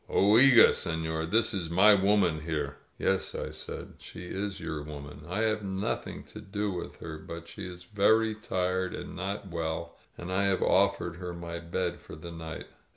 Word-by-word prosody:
Oiga^ 115 +5 +7
seiior, 80 0 -1
this 110 +3 +3
is 90 -5 -2
my 95 +5 +7
woman 95 -5 +3
here 75 -3 -3
!" - - -38
"Yes," 95 0 0
I - - -3
said. - - -7
"She 90 - -9
is 95 +2 -3
your 75 -2 -4
woman. 75 0 -8
I 100 +4 -1
have 110 -1 +1
noth 95 0 -2
ing - - -7
to - - -11
do 105 +1 -2
with 90 - -6
her. 80 -1 -6
But 85 +1 -8
she 90 +3 -7
is 90 0 -9
very 110 +3 +3
tired 95 -4 -1
and - - -7
not 95 +1 -4
well, 80 -1 -3 0.2
and 85 +1 -6
I 100 +1 +2
have 95 -1 +2
offered 100 -3 +2
her 90 -1 -5
my 85 0 -5
bed 85 +1 -2
for - - -10
the 85 +3 -9
night." 80 -1 -7
90 Hz, 190 wpm, -29 LUFS, 85-100 Hz, 0.2 s, Oiga^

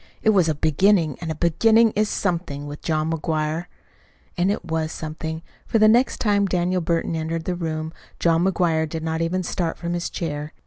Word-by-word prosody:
It 220 - +5
was 185 -6 +3
a 155 - 0
beginning, 160 +1 +2
and 165 - -4
a 160 - -2
beginning 220 +8 +4
is 210 0 0
something 170 -7 -2
with 145 +1 -8
John 155 0 0
McGuire." 160 +1 -2 0.7
And 180 +1 +1
it 205 - -3
was 160 -1 -2
something; 160 +1 -5 0.2
for - - +2
the 215 0 +6
next 240 +4 +4
time 205 -2 +2
Daniel 180 0 0
Burton 165 0 -1
entered 160 +1 -3
the 180 - -1
room, 160 -2 -4 0.2
John 165 0 +2
McGuire 165 -4 +1
did 160 0 -5
not 160 0 -2
even 180 +3 0
start 170 -1 -2
from 170 0 -3
his 175 0 -2
chair. 150 -2 -4
165 Hz, 190 wpm, -23 LUFS, 160-185 Hz, 0.7 s, the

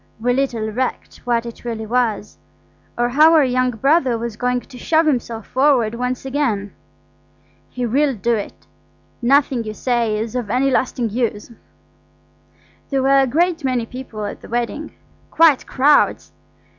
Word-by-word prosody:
We 245 +2 +1
little 240 -5 -1
recked 255 +3 -3
what 235 -1 0
it 235 - -9
really 225 -2 -4
was, 220 -3 -1 0.6
or 240 0 +1
how 310 +6 +5
our 310 - +6
young 255 0 +1
brother 265 +1 +2
was 230 -1 -5
going 250 +1 -1
to 250 - -14
shove 320 +4 +2
himself 235 -6 -1
forward 260 -5 +2
once 250 +2 -3
again. 235 -8 -2 1.0
He 250 -1 -4
will 275 +3 +1
do 235 +3 0
it. 210 -3 -5 0.6
Nothing 265 -1 +2
you 215 -1 -6
say 235 -4 0
is 220 +2 -4
of 240 -5 -3
any 260 +4 +1
lasting 245 -3 0
use. 230 -1 -2 1.4
There 270 -2 0
were 275 +1 +4
a 270 - +3
great 335 +4 0
many 255 -3 0
people 230 -4 -7
at - - -7
the - - -13
wedding–quite 290 +4 0
crowds. 285 +3 +2
250 Hz, 150 wpm, -19 LUFS, 230-270 Hz, 1.4 s, our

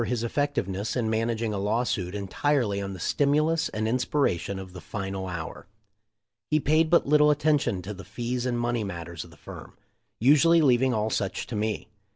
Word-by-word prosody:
333 125 - -1
his 115 - -3
effectiveness 110 -6 -1
in 120 -3 0
managing 115 0 -1
a 100 - -2
law 105 +5 +1
suit 95 -5 -2
entirely 105 +1 0
on 100 0 -4
the 95 - -8
stimulus 155 - +1
and 110 +1 -2
inspiration 120 - 0
of 95 -1 -8
the 90 - -9
final 95 +1 -4
hour. 85 -1 -6 0.8
He 155 - +3
paid 155 +2 +2
but 170 - +4
little 150 +1 +5
attention 145 -10 +1
to 105 +4 -5
the 95 -1 -10
fees 120 +1 -3
and 120 -1 -1
money 120 -1 0
mat 85 -4 -5
ters 85 -3 -7
of - - -14
the - - -17
firm - - -11 0.2
— - - -51
usually 150 +7 +5
leaving 130 -3 +4
all 110 -1 0
such 100 -2 -2
to 115 - -6
me. 105 0 -2
115 Hz, 200 wpm, -26 LUFS, 100-140 Hz, 0.8 s, little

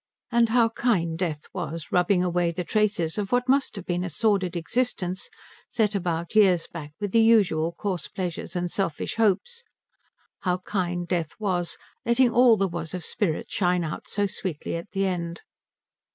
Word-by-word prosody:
And 235 -1 +4
how 230 0 +4
kind 195 -9 0
Death 160 -4 -2
was, 165 -1 -5
rubbing 180 +1 +3
away 175 -1 +1
the 175 +2 -3
traces 205 -3 0
of 200 -1 -3
what 245 +1 +2
must 275 +1 +2
have 195 -3 -7
been 175 0 -1
a 180 - -3
sordid 190 0 +1
existence, 185 0 -1 0.4
set 215 -2 +1
about 170 -3 -2
years 185 -6 +5
back 150 -3 -9
with 205 -2 -3
the 230 - +5
usual 195 -8 +4
coarse 185 -1 -3
pleasures 180 -2 -5
and 175 -1 -1
selfish 195 -2 -2
hopes, 225 - +1 0.8
how 180 -1 0
kind 175 -3 -2
Death 170 -3 -1
was, 180 -5 -1 0.3
letting 235 +1 +4
all 240 -1 +6
there 195 0 +2
was 170 -1 -5
of 175 -3 -4
spirit 170 -7 -1
shine 180 -2 +1
out 155 - -5
so 205 0 0
sweetly 185 -6 -4
at 170 +4 -6
the 195 0 0
end. 170 -2 -3
185 Hz, 170 wpm, -26 LUFS, 170-215 Hz, 0.8 s, all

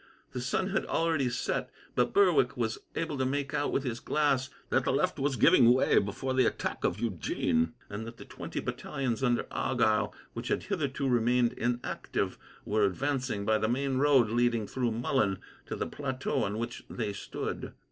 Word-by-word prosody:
The 125 - -4
sun 125 +9 0
had 195 - +1
already 160 -6 +1
set, 120 - -2 0.2
but - - +2
Berwick 405 0 +4
was 425 - -1 0.2
able 160 -4 -2
to - - +2
make 140 +1 -1
out, 145 - 0
with 135 - 0
his 120 -3 -3
glass, 140 -4 +1 0.2
that - - +3
the - - +1
left - - +1
was 135 0 +1
giving 125 -5 +6
way 130 - +4
before 120 +6 -2
the 130 -3 +4
attack - - -3
of - - 0
Eugene, 85 -2 0
and 105 +2 -6
that 115 0 -9
the - - -10
twenty - - -6
battalions 130 -3 -3
under 120 -2 +2
Argyle, 110 -4 +1 0.2
which 115 +1 -5
had - - 0
hitherto 145 -8 -1
remained 120 0 +3
inactive, 120 +1 -2 0.3
were 105 0 +2
advancing 125 0 -1
by 110 0 +3
the 110 +1 +1
main 135 +2 0
road 135 -5 +4
leading, 120 -2 +2
through 125 +2 -1
Mullen, 110 -3 +1 0.3
to - - -3
the - - -2
plateau 130 -2 -2
on 100 +2 -3
which 120 +1 -4
they 105 -4 -3
stood. - - -5
125 Hz, 180 wpm, -30 LUFS, 115-140 Hz, 0.3 s, giving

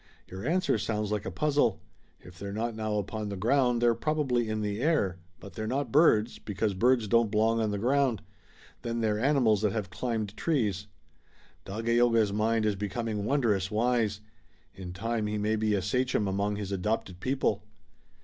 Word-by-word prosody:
"Your 95 +6 -7
answer 175 -8 +1
sounds 105 0 -2
like 105 -2 -2
a - - -1
puzzle. 145 0 +1 0.4
If 90 -1 -14
they're 100 0 -5
not 115 +3 -2
now 110 -1 -2
upon 105 +1 -3
the 100 - -5
ground 120 +3 +2
they're 120 -1 +5
probably 130 -5 0
in 110 0 -2
the 105 +1 -2
air, 115 - +1 0.2
but 100 -1 -11
they're 110 +4 -4
not 135 +5 -2
birds, 120 -7 +4
because 105 0 -2
birds 120 +3 +2
don't 115 +1 +3
belong 110 +2 +2
on 110 - 0
the 105 - -2
ground. 125 0 +1 0.6
Then 115 0 -3
they're 105 -1 +1
animals 125 -5 +3
that 105 -3 +1
have 105 -5 -3
climbed 110 -2 -3
trees." 105 - -1 0.8
"Dagaeoga's 115 0 +2
mind 110 +1 +1
is 105 -1 +1
becoming 105 +1 -3
wondrous 110 -8 +1
wise. 110 -1 0 0.5
In 95 -2 -8
time 110 +3 -2
he 105 0 -2
may 105 +1 0
be 110 -1 +1
a 95 - -1
sachem 125 0 0
among 100 +2 -1
his 100 -1 -5
adopted 95 -1 -2
people." 130 -4 0
110 Hz, 175 wpm, -29 LUFS, 100-120 Hz, 0.8 s, they're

